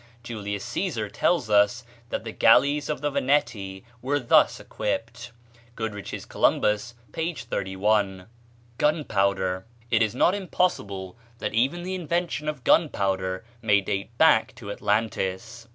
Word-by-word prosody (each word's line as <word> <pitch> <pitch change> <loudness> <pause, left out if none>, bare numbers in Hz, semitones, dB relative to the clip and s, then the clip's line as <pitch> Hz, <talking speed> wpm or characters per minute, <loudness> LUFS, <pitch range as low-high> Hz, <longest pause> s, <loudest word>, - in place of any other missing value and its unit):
Julius 100 -3 -5
Cæsar 120 - -2
tells 170 -10 +1
us 105 +3 +3 0.3
that - - -3
the 115 - -5
galleys 140 +7 +4
of 150 - -2
the 145 0 0
Veneti 125 -9 0 0.2
were 140 +4 0
thus 125 - +4
equipped. 115 +3 -4 0.4
(Goodrich's 105 -4 -5
"Columbus," 105 +3 +1 0.2
p. 165 +1 -2
31.) 95 -2 -1 0.5
Gunpowder. 100 - +1 0.2
It 115 -1 +4
is 110 +1 +1
not 175 - +4
impossible 115 - -2 0.2
that - - -3
even 135 +10 +1
the 185 +1 -4
invention 170 -3 -2
of 150 - -6
gunpowder 95 - +1 0.2
may 105 -3 +4
date 100 +4 -4
back 160 -8 +4
to 105 -4 -7
Atlantis. 110 +2 -2
115 Hz, 125 wpm, -25 LUFS, 100-145 Hz, 0.5 s, galleys